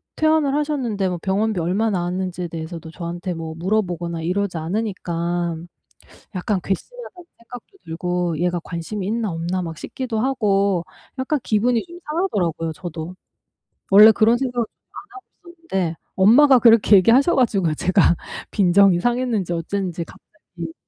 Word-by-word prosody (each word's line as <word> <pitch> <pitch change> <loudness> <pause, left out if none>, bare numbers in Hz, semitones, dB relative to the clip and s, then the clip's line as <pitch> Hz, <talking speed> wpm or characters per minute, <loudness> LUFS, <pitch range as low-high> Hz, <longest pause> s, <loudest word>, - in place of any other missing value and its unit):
퇴원을 310 -3 +2
하셨는데 255 -10 -1
뭐 180 -1 -4
병원비 205 +1 0
얼마 190 +7 0
나왔는지에 180 -1 -3
대해서도 165 0 -7
저한테 175 +2 -5
뭐 165 -1 -6
물어보거나 175 -3 -2
이러지 180 +2 -1
않으니까 175 -2 -2 0.8
약간 185 +1 -1
괘씸하다는 365 - -6
생각도 245 +9 -12
들고 175 0 -2
얘가 175 +1 0
관심이 185 +4 -5
있나 220 0 -1
없나 170 +3 -2
막 165 -2 -6
싶기도 240 +5 -4
하고 200 -8 +1 0.3
약간 265 +3 -1
기분이 230 +2 +1
좀 345 0 -12
상하더라고요 185 - -1
저도. 170 0 -7 0.8
원래 210 +3 +9
그런 220 +2 +3
생각을 245 -2 -2
좀 - - -46 0.2
안 - - -9
하고 385 - -12 0.4
있었는데 175 -4 -1 0.2
엄마가 255 +8 +6
그렇게 225 -3 +6
얘기하셔 240 - +4
가지고 200 - +2
제가 180 +1 +3 0.3
빈정이 195 -1 +4
상했는지 240 -5 -1
어쨌는지 175 0 -3
갑자기 170 -4 -11
190 Hz, 355 characters per minute, -21 LUFS, 175-230 Hz, 0.8 s, 원래